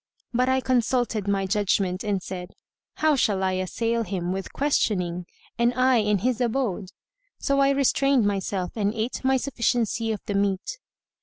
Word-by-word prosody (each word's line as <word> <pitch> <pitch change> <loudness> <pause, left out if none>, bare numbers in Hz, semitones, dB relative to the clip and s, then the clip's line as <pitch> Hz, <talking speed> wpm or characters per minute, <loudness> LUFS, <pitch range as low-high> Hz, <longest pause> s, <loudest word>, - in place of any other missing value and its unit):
But 250 +2 +2
I 260 0 +2
consulted 245 -4 0
my 195 -1 +1
judgment 195 -2 0
and 200 -3 -1
said, 180 -1 -7 0.4
"How 310 -1 +3
shall 205 -7 +1
I 190 - +2
assail 225 +5 -1
him 180 -5 -3
with 190 0 -4
questioning, 180 -11 0 0.3
and 240 +1 +2
I 255 0 +4
in 210 -2 +2
his 255 -1 +1
abode?" 225 -6 -1 0.5
So 275 -1 0
I 275 0 +4
restrained 275 -2 +3
myself 195 -2 -1
and 210 0 0
ate 225 +4 -3
my 265 0 +3
sufficiency 235 -3 0
of 210 - -3
the 205 - -3
meat. 200 - -1
220 Hz, 160 wpm, -25 LUFS, 195-255 Hz, 0.5 s, I